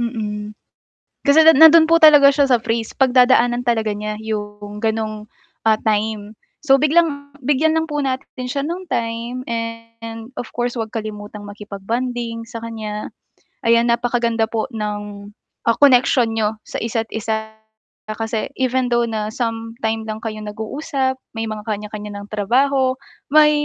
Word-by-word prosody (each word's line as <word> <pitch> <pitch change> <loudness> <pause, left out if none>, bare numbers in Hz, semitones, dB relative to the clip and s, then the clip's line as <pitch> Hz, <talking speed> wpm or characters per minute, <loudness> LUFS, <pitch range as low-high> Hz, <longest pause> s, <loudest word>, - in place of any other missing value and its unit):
Mm, 210 -3 -4 0.7
kasi 290 +3 +7
nandun 320 +2 +8
po 330 - +6
talaga 295 -3 +8
siya 280 0 +2
sa 250 - +5
phase 225 0 -2
'pag 265 -2 +3
dadaanan 245 -1 +4
talaga 220 -3 +1
niya 210 +1 -4
yung 205 -1 -5
ganong, 215 -1 -2 0.4
ah, 220 - +5
time 215 -1 -1 0.3
so 270 -2 +5
biglang 300 -2 +2 0.2
bigyan 300 +4 +2
lang 320 - +1
po 295 -2 -3
natin 260 -1 -4
siya 280 +2 -2
ng 350 +4 -5
time 235 +2 -3
and 230 0 -6
of 245 - -7
course 240 0 -1
huwag 220 - -3
kalimutang 210 -1 -7
makipag-bonding 230 +3 -4
sa 235 - -8
kanya. 215 -2 -6 0.5
Ayan, 235 +1 +4
napakaganda 235 -1 +1
po 225 +3 -3
ng, 205 -2 -5 0.4
ah, 230 - +4
connection 250 -3 +4
niyo 215 0 +1
sa - - -7
isa't 225 0 -2
isa, 220 0 -3 0.6
kasi 220 0 -3
even 260 0 0
though 240 - +3
na 215 -1 -2
sometime 225 -2 -3
lang 215 0 -5
kayong 215 -1 -5
nag-uusap, 260 +5 -3 0.2
may 225 0 -3
mga 215 0 -6
kanya-kanya 210 -1 -5
ng - - -10
trabaho, 255 +5 +2 0.3
may 300 +1 +6
230 Hz, 145 wpm, -20 LUFS, 215-255 Hz, 0.7 s, nandun